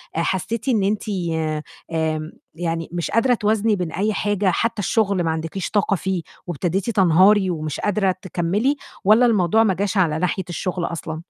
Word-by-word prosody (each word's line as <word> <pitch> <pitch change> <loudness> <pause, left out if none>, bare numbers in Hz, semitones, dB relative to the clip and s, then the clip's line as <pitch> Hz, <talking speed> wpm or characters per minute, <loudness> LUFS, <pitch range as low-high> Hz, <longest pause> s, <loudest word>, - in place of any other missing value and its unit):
حسّيتِ 190 +8 -2
إن 220 -6 +2
أنتِ 205 +2 0 0.9
آمم، 160 -1 -1 0.2
يعني 165 -1 -3
مش 175 -1 -3
قادرة 240 +3 +3
توازني 215 -1 +1
بين 180 -4 -3
أي 210 +5 0
حاجة؟ 205 -2 +1
حتى 230 -1 -1
الشغل 200 -2 +1
ما 165 - 0
عندكيش 165 +4 -4
طاقة 205 -1 +2
فيه 185 +1 -2 0.3
وابتديتي 175 - -1
تنهاري 190 +1 +4
ومش 155 -4 -3
قادرة 195 -2 +1
تكمّلي، 185 - 0 0.3
والَّا 215 +5 +5
الموضوع 220 -1 +3
ما 205 -4 +2
جاش 200 +2 -2
على 160 -4 +2
ناحية 180 +2 -1
الشغل 175 +1 -2
أصلًا؟ 160 -1 -5
190 Hz, 160 wpm, -21 LUFS, 170-210 Hz, 0.9 s, والَّا